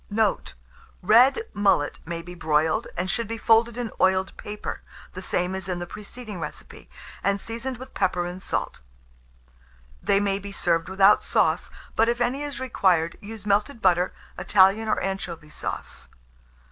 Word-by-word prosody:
Note. 215 -1 0 0.5
Red 245 - +6
mullet 200 -8 +2
may 170 0 -4
be 180 - -9
broiled, 155 -2 +1
and 180 - -1
should 230 +3 -1
be 230 +1 -4
folded 230 +1 +3
in 240 -2 -3
oiled 190 0 +2
paper, 210 0 -6 0.3
the - - -7
same 180 +1 -1
as 190 -1 -5
in 180 - -1
the 175 - -4
preceding 210 +2 -8
recipe, - - -8 0.3
and 200 0 +1
seasoned 235 +4 -4
with 260 +2 -11
pepper 180 -3 0
and 180 +1 -6
salt. - - -3 1.2
They 200 - +3
may 200 -1 0
be 200 0 -8
served 165 -4 0
without 195 +2 +5
sauce; - - +1 0.3
but 225 +1 +4
if 240 0 0
any 245 +3 0
is 290 -1 -5
required, 185 -10 +1
use 210 0 -9
melted 210 +5 +1
butter, 180 -2 +3 0.3
Italian 200 +3 +4
or 215 - +1
anchovy 170 -5 -4
sauce. - - -6
200 Hz, 160 wpm, -25 LUFS, 180-225 Hz, 1.2 s, Red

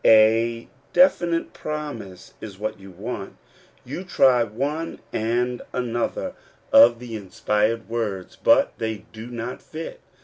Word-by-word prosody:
A 115 +1 +5 0.3
definite 175 -11 +3
promise 145 -12 -6
is 100 -4 -8
what 110 +1 -4
you 95 0 -12
want. 100 +2 -6 0.5
You 145 +9 -5
try 130 -9 +4
one 145 +9 -3 0.2
and 120 +3 0
another 120 -2 -2 0.4
of 120 0 +8
the 120 -1 -7
inspired 105 +2 0
words, 110 -5 -3
but - - +4
they 110 -2 -3
do 110 +1 -8
not 120 0 -5
fit. 160 +1 -7
115 Hz, 125 wpm, -24 LUFS, 110-125 Hz, 0.5 s, of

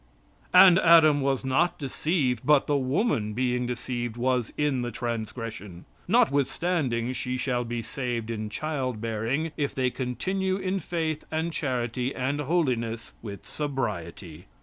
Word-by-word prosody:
"And 180 0 +8
Adam 160 -4 +6
was 135 -1 0
not 145 +7 +2
deceived, 140 -3 -1
but 150 -2 +4
the 145 - +1
woman 130 - 0
being 125 +1 0
deceived 120 -1 -4
was 125 -1 0
in 145 -4 +1
the 120 - -2
transgression. 115 -5 -5 0.2
Notwithstanding 145 - +1
she 125 0 -2
shall 125 -1 -1
be 120 0 -4
saved 120 -3 -3
in 110 -1 -4
child 130 -3 -3
bearing 115 +8 -1
if 145 -2 -1
they 130 -1 +1
continue 185 +11 -1
in 190 0 -1
faith 160 -4 -2
and 160 +1 -2
charity 125 -2 -2
and 135 +3 -1
holiness 125 -8 -1
with 100 -3 -8
sobriety." 100 - -4
130 Hz, 135 wpm, -27 LUFS, 115-155 Hz, 0.2 s, And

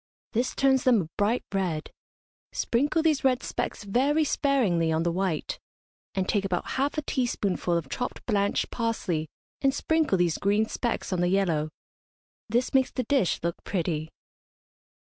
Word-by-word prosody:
This 240 +3 0
turns 265 -1 +3
them 245 -5 +5
a - - -9
bright 215 +4 +1
red. 175 -5 -1 0.6
Sprinkle 290 +6 +1
these 310 -4 +2
red 260 -1 +2
specks - - -3
very 270 +10 +2
sparingly 230 - +2
on 160 +1 +1
the 170 - +1
white, 180 -3 -2 0.6
and 190 -1 0
take 205 -2 +1
about 185 -3 -2
half 280 +3 0
a 305 - 0
teaspoonful 200 -10 0
of 165 -5 -4
chopped 245 - -4
blanched 200 -3 +1
parsley, 190 -9 -1 0.3
and 275 0 +2
sprinkle 315 -9 +2
these 175 -2 +1
green 205 +2 +2
specks 235 -3 -2
on 180 - 0
the 175 - +3
yellow. 175 -5 +1 0.8
This 240 +4 +1
makes 265 -1 +4
the 255 - -2
dish 245 -6 +1
look 170 0 -3
pretty. 160 -4 -2
205 Hz, 155 wpm, -27 LUFS, 175-260 Hz, 0.8 s, them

